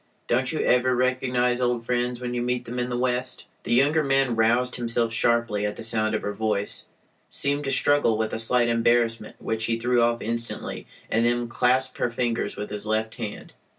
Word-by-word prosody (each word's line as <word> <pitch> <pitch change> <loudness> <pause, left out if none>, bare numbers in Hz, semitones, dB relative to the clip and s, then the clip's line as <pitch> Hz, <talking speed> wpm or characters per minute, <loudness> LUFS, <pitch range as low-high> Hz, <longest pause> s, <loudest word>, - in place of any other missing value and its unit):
Don't 125 +1 +1
you 155 - -1
ever 125 +1 +3
recognize 125 -1 +1
old 120 -2 0
friends 125 0 -1
when 125 -1 -4
you 120 - -1
meet 125 0 -1
them 125 +1 -5
in 125 0 -1
the 120 - -2
West?" 125 0 -1 0.2
The - - -4
younger 150 +5 +3
man 135 -3 +2
roused 120 +3 +2
himself 115 -1 0
sharply 115 -3 +1
at 105 0 -2
the - - -8
sound 110 -1 +1
of - - -3
her 105 - -2
voice, 105 -1 -1 0.4
seemed 145 +1 +1
to 135 - -1
struggle 145 -7 +3
with 110 0 -2
a - - -2
slight 120 +1 +2
embarrassment 115 0 +1
which 110 0 -2
he 115 0 0
threw 120 +1 +2
off 120 0 +2
instantly, 115 +1 -4 0.2
and 115 - +2
then 120 0 0
clasped 125 +2 +1
her - - +1
fingers 120 0 -2
with 105 - -5
his 105 0 -4
left 110 0 0
hand. 110 -3 -7
120 Hz, 200 wpm, -25 LUFS, 115-125 Hz, 0.4 s, ever